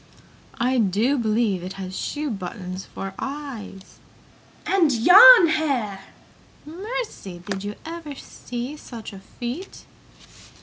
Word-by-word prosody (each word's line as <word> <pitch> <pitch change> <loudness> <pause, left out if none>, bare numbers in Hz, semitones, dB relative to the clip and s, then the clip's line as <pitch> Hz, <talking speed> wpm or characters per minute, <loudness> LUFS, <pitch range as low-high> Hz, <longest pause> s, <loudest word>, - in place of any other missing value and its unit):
"I 250 +2 +1
do 220 +6 +2
believe 220 -5 0
it 185 +2 -6
has 190 -1 -7
shoe 295 +5 -3
buttons 185 -2 -6
for 195 0 -7
eyes!" 265 -9 -7 0.7
"And 355 -6 +3
yarn 360 - +9
hair!" 255 -11 -1 0.6
"Mercy, 355 - -6
did 195 -1 -4
you 205 0 -5
ever 325 -3 -7
see 245 +2 -7
such 230 -7 -9 0.3
feet!" 255 +11 -6
240 Hz, 105 wpm, -23 LUFS, 195-305 Hz, 0.7 s, yarn